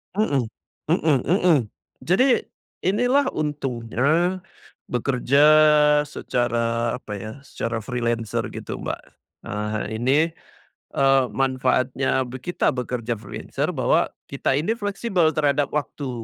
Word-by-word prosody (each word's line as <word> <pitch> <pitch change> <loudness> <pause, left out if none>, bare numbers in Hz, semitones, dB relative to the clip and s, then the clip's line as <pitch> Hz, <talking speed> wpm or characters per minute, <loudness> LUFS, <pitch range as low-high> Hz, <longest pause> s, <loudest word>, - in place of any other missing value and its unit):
Mhm 140 - +1 0.4
mhm 155 -4 +2
mhm. 180 -3 +4 0.5
Jadi 190 +9 +4 0.6
inilah 245 +7 +3
untungnya 150 +4 0 0.5
bekerja 125 +2 +1 0.7
secara 115 -2 -1
apa 125 -4 -10
ya, 110 +2 -6
secara 115 -4 -4
freelancer 120 -2 -2
gitu, - - -6
Mbak. - - -4 0.4
Eee, 105 +1 -3
ini, 130 +5 +3 0.8
eee, 135 -1 +4
manfaatnya 130 0 +1
be 125 +1 -8
kita 175 +7 0
bekerja 125 -2 -3
freelancer 100 - -4
bahwa - - +2 0.2
kita 140 -1 -1
ini 170 +10 0
fleksibel 200 -5 0
terhadap 145 -2 +2
waktu. 145 -1 -3
135 Hz, 105 wpm, -23 LUFS, 120-155 Hz, 0.8 s, mhm